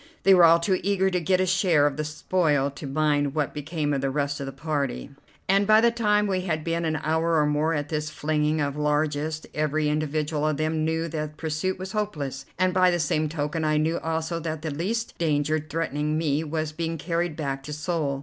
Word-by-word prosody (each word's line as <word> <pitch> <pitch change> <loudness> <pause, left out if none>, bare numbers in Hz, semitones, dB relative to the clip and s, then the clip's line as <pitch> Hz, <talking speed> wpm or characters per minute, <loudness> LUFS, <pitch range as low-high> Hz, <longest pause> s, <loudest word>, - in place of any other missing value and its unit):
They 195 - +7
were 180 -2 +7
all 165 0 +7
too 185 +2 +1
eager 190 0 +1
to 180 - +1
get 185 +3 +2
a 185 - +3
share 180 -5 +3
of 145 -2 +1
the 155 - -2
spoil 150 -2 0
to 140 +1 -8
mind 145 0 +1
what 150 -3 -1
became 150 0 -2
of 135 - -1
the 135 - 0
rest 140 +1 -1
of 140 - -4
the - - -4
party, 140 -1 -3 0.4
and 195 +1 +3
by 215 0 +7
the 235 +1 +4
time 210 -3 +2
we 190 -2 0
had 160 -4 -2
been 165 +1 -1
an 160 -1 0
hour 160 +2 +1
or 150 -1 +4
more 150 +2 +1
at 145 0 -3
this 155 -1 -2
flinging 150 +1 0
of 140 -1 -1
largesse 150 +1 -1
every 155 0 0
individual 150 0 -1
of 155 -2 0
them 155 +1 0
knew 160 +1 0
that 155 -1 -4
pursuit 160 +4 -2
was 190 +1 -6
hopeless, 145 -11 -3
and 185 +1 +2
by 185 0 +5
the 175 - +1
same 155 -1 0
token 150 +1 -2
I 155 0 +2
knew 160 +2 +1
also 165 +1 -2
that 160 -1 -4
the 160 - -2
least 210 +10 -2
danger 155 -1 +1
threatening 155 -1 -2
me 155 -1 0
was 155 0 -3
being 165 +1 -3
carried 170 0 -2
back 135 -3 -3
to 150 - -6
Seoul. 150 -3 -2
155 Hz, 220 wpm, -25 LUFS, 150-170 Hz, 0.4 s, They